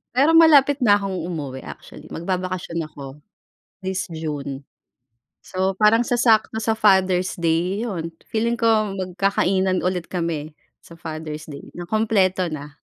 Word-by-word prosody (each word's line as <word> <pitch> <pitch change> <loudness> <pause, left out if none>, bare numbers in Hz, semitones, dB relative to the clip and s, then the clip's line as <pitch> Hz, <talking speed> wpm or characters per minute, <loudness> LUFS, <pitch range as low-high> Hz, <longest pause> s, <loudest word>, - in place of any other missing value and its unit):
Pero 285 +5 +4
malapit 290 -4 +6
na 210 -5 +5
akong 195 -2 -3
umuwi 140 -7 -5
actually - - -11
magbabakasyon 180 -1 -3
ako. 140 -2 -10 0.8
This 190 0 -2
June. 145 -3 -5 0.8
So 190 +1 -1
parang 220 +4 +4
sasakto 230 -3 +3
sa 225 - +1
Father's 190 -3 +3
Day 175 +5 0
yun, 165 -7 -4 0.2
feeling 230 +2 0
ko 215 -4 +2
magkakainan 185 0 0
ulit 180 -2 -1
kami 160 -4 -3 0.2
sa 170 - -15
Father's 155 -2 -6
Day 140 - -10
na 175 - -6
kumpleto 190 -2 +1
na. 150 -2 -8
185 Hz, 130 wpm, -22 LUFS, 165-215 Hz, 0.8 s, malapit